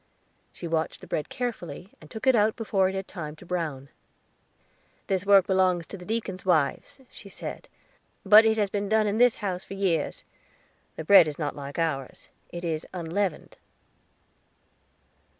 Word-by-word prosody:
She 170 - -8
watched 160 -1 -2
the - - -10
bread 150 - -3
carefully, 195 - -5
and 155 - -14
took 220 - -7
it 260 - +6
out 215 -1 +3
before 195 -4 +1
it 190 - -5
had 190 0 -4
time 155 -4 -7
to 170 - -15
brown. 155 -6 -4 1.2
"This 195 -1 -2
work 200 -2 +6
belongs 185 -3 +2
to - - -9
the 180 -2 -11
deacons' 210 -4 -3
wives," 160 - 0
she 200 - -12
said; - - -8 0.6
"but 215 +1 +9
it 220 0 +2
has 205 -2 0
been 200 -1 -2
done 220 0 +3
in 210 +2 -1
this 245 -1 +5
house 185 -2 -3
for 195 - -9
years. 190 -4 -1 0.7
The 160 - -6
bread 185 0 +7
is 150 - -5
not 150 -3 -3
like 140 0 -8
ours 145 -6 -3 0.2
it 175 0 -7
is 160 -1 -2
unleavened." 180 +1 -3
185 Hz, 170 wpm, -26 LUFS, 160-205 Hz, 1.2 s, but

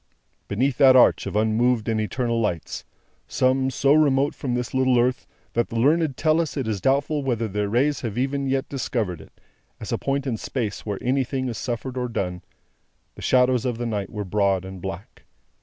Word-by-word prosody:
Beneath 125 +5 0
that 130 -1 +7
arch 125 - +5
of - - -5
unmoved 110 +2 +2
and 110 -1 +1
eternal 115 +1 -1
lights; 90 -7 -3 0.4
some, 130 +1 +1
so 135 +2 +2
remote 145 -2 +3
from 125 -3 -3
this 125 -1 -3
little 130 -1 +3
earth 125 +2 0 0.3
that 120 - 0
the - - -7
learned 145 +4 +2
tell 160 +1 +3
us 160 -2 -4
it 130 -5 -2
is 105 -4 -2
doubtful 140 +3 +1
whether 120 -4 -1
their 105 0 -2
rays 135 +6 +1
have 115 -3 -4
even 135 +2 -1
yet 135 0 0
discovered 115 - -3
it, - - -18 0.4
as - - -7
a - - -1
point 140 0 -1
in 120 -5 -1
space 110 -3 -4
where 100 -2 -2
anything 130 +1 0
is 115 - -5
suffered 125 +1 -4
or 125 -1 -1
done: 90 -6 -3 0.7
the - - -12
shadows 125 -1 +3
of 125 -3 -2
the 120 - -3
night 105 -4 -2
were 105 -2 -5
broad 95 -1 +1
and 95 -1 -9
black. 95 +1 -7
125 Hz, 195 wpm, -24 LUFS, 110-135 Hz, 0.7 s, that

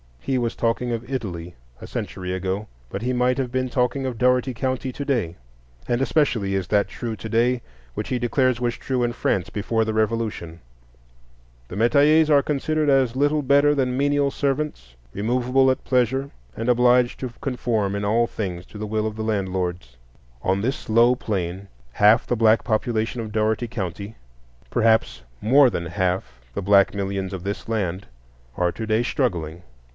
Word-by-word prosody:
He 130 - -1
was 120 -1 -2
talking 120 +1 0
of 115 +1 -4
Italy 90 -9 -4 0.2
a - - -9
century 90 -1 -5
ago; 95 +3 -2 0.2
but - - -5
he 125 +2 -1
might 125 +1 +1
have 130 -3 -2
been 130 0 -1
talking 125 +2 0
of 125 -3 -3
Dougherty 125 +1 +2
County 130 +1 -2
to 140 - -5
day. 115 - -1 0.5
And 120 +1 0
especially 125 -9 +1
is 95 -2 -2
that 105 -1 +2
true 115 -2 -5
to 110 +2 -8
day 120 +2 +2 0.3
which - - -4
he 125 - 0
declares 125 0 +1
was 120 -1 0
true 130 -2 -1
in 120 0 0
France 95 -6 -1
before 110 +2 0
the 110 0 -2
Revolution: 110 -7 -1 1.1
"The 90 - -8
metayers 145 +8 +4
are 145 -2 +6
considered 150 +1 0
as 130 -3 +3
little 145 +2 +2
better 140 +2 +4
than 130 -2 0
menial 145 0 +2
servants, 135 - -2 0.2
removable 125 +5 +2
at 130 - 0
pleasure, 130 +2 +1 0.3
and 115 +2 -2
obliged 125 0 +3
to 125 -3 -5
conform 115 -6 -1
in 100 0 -2
all 115 +3 +3
things 90 -6 -5
to - - -11
the 105 0 -4
will 110 0 -1
of 110 - -5
the 110 - -4
landlords." 90 - -2 0.5
On 95 +1 +1
this 135 +7 -3
low 120 +3 +5
plane 95 -4 -3 0.3
half 105 +3 +5
the 120 - 0
black 110 0 +4
population 115 +1 -1
of 110 -1 -6
Dougherty 110 +2 0
County—perhaps 90 - -2 0.2
more 130 +4 +6
than 85 -6 -3
half 90 -9 -2
the - - -3
black 100 0 +4
millions 100 -1 -3
of 90 -2 -5
this 100 +3 -4
land—are 85 - -4
to 110 - -5
day 110 +2 +2
struggling. 85 - -2
115 Hz, 170 wpm, -23 LUFS, 95-125 Hz, 1.1 s, are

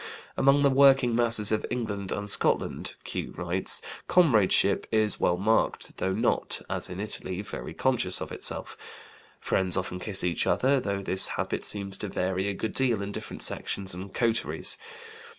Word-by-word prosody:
"Among 140 +1 +3
the 140 - +4
working 135 -3 +4
masses 115 -3 +4
of 110 - 0
England 105 -5 -4
and 100 0 -4
Scotland," 100 - +1
Q. - - -6
writes, - - -1 0.2
"'comradeship' 110 - +3
is 110 -1 +1
well 90 - +1
marked, 110 +4 0
though 95 - -1
not 105 - +1
(as - - -2
in 90 +1 -7
Italy) 100 -2 -2
very 105 - -8
conscious - - +1
of - - -7
itself. - - -4 0.6
Friends 95 -1 +2
often 90 0 -3
kiss 100 +1 -1
each 90 -1 0
other, 135 +1 +2
though 100 -4 -3
this 95 0 +3
habit - - -3
seems 100 -2 -3
to 105 - -3
vary 95 +1 -2
a 100 - -2
good 110 +2 -4
deal 125 -5 0
in 100 - -5
different - - -3
sections 95 -2 +1
and 95 +2 -8
coteries. 115 +1 0
105 Hz, 165 wpm, -27 LUFS, 95-120 Hz, 0.6 s, the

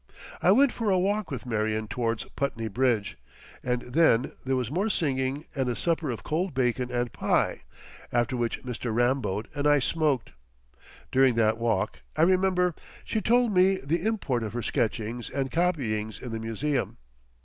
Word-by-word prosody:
I 180 - +5
went 265 +5 +5
for 225 -3 -1
a 190 - +4
walk 200 +2 0
with 130 -4 -5
Marion 110 -2 -1
towards 115 -3 -1
Putney 115 -5 -2
Bridge, 110 - 0 0.4
and 125 -1 -1
then 125 -3 +3
there 130 0 0
was 125 -1 -2
more 195 +8 0
singing 140 -4 -1
and 135 -4 -1
a 120 - -1
supper 165 -1 0
of 120 - -4
cold 170 +1 -2
bacon 125 -1 0
and 120 -1 -1
pie, - - +1 0.5
after 120 +1 +1
which 120 -1 -2
Mr. 125 -2 -4
Ramboat 120 -3 0
and 145 -1 0
I 145 0 +6
smoked. 145 -3 0 0.8
During 130 -2 +4
that 110 0 +2
walk, 110 -3 0 0.2
I 155 - +4
remember, 185 0 +3 0.3
she 220 - -1
told 240 +1 +3
me 190 +1 +4
the 165 +3 -2
import 200 - 0
of 110 -1 -4
her 120 -1 -3
sketchings 115 +2 -2
and 135 -1 -2
copyings 125 - -1
in 125 - -7
the 115 - -3
museum. 125 +6 -2
130 Hz, 170 wpm, -27 LUFS, 115-165 Hz, 0.8 s, I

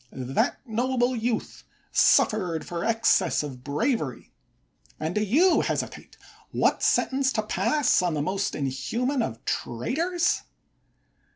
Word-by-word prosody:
That 130 - -2
noble 245 +2 0
youth 230 0 -3 0.3
suffered 180 -7 +3
for 170 -1 -4
excess 230 -8 +2
of 130 -4 -8
bravery; 150 - -2 0.7
and 160 +2 -2
do 210 - 0
you 300 - +4
hesitate - - -4 0.3
what - - +1
sentence 265 0 +2
to 215 - 0
pass 295 +5 +2
on 175 -3 0
the 145 - -1
most 195 +4 -1
inhuman 225 - -1
of 115 - -4
traitors 325 - -1
215 Hz, 115 wpm, -26 LUFS, -, 0.7 s, you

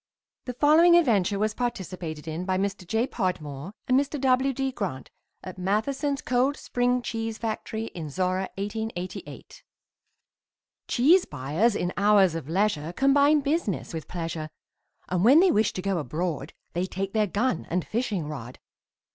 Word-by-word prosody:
The 250 - -5
following 315 +6 +6
adventure 210 - +3
was 215 +1 0
participated 180 -10 -4
in 160 +3 -3
by 185 0 0
Mr. 195 -2 -3
J. 225 +5 +1
Podmore 180 - -3
and 255 +1 +4
Mr. 285 +1 -2
W. 260 0 +3
D. 270 +1 -2
Grant 185 - -5 0.3
at 185 0 -8
Matheson's 270 +9 -1
Cold 255 +3 +1
Spring 245 0 0
Cheese 225 -1 -3
Factory 220 0 -4
in 160 -3 -6
Zorra, 185 +4 -1
1888. 200 -2 -6 1.2
Cheese 325 +10 +4
buyers 150 - 0
in 180 -2 -1
hours 200 -3 +5
of 160 -3 -5
leisure 170 -4 0
Combine 285 +4 +4
business 280 - -1
with 160 -1 -5
pleasure, 165 -3 -4 0.6
And 180 0 0
when 265 +8 +7
they 370 0 +5
wish 210 0 +2
to 185 - -5
go 195 -3 0
abroad 155 +1 -3 0.2
They 180 +2 -1
take 195 +1 -4
their 215 -1 +2
gun 205 -1 -1
and 180 0 -1
fishing 215 -8 -2
rod. 130 -5 -7
200 Hz, 150 wpm, -26 LUFS, 175-250 Hz, 1.2 s, when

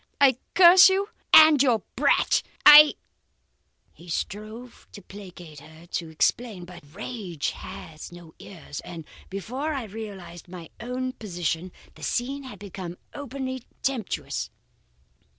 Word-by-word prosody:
I 265 -3 +4 0.2
curse 360 +1 +8
you 390 +2 -1 0.2
and 310 -3 +8
your 240 -7 +2
brat. - - +2 0.2
I 295 0 +10 0.5
' - - -45
"He 170 +1 -16
strove 215 +8 -6
to 205 - -11
placate 180 -6 -12
her, 160 +3 -16
to 170 -1 -5
explain. 185 +4 -1
But 175 -1 -13
rage 200 - -5
has 155 +1 -10
no 170 -2 -14
ears, 160 -6 -10
and 165 -3 -9 0.2
before 255 +11 -4
I 265 - -4
realized 195 -6 -9
my 175 -2 -11
own 255 +2 -4
position, 175 - -4 0.2
the - - -18
scene 265 +2 -3
became 185 -3 -9 0.2
openly 260 -2 -6 0.2
tempestuous. 255 -7 -3
210 Hz, 125 wpm, -25 LUFS, 175-260 Hz, 0.5 s, I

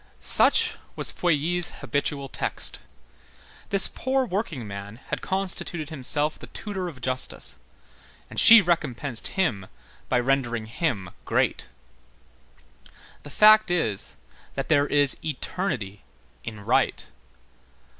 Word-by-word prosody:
Such - - +3 0.2
was - - 0
Feuilly's 175 +1 0
habitual 140 -1 -2
text. - - -1 0.9
This 195 -1 +8
poor 265 0 -1
workingman 115 - -5
had 125 - -7
constituted 180 -4 0
himself 150 +1 0
the - - -11
tutor 195 -4 -6
of 135 -7 -13
Justice, 130 +1 0 0.7
and - - -4
she 225 -1 +9
recompensed 145 - -2
him 110 - -1 0.4
by 125 - +2
rendering 120 -3 -1
him 110 - -3
great. - - -1 1.5
The 145 - -12
fact 215 +6 +5
is, 135 - -2 0.4
that 135 - -4
there 145 -2 +3
is 145 -1 +3
eternity 130 - -4 0.4
in 110 -2 -8
right. - - 0
145 Hz, 105 wpm, -24 LUFS, 120-175 Hz, 1.5 s, she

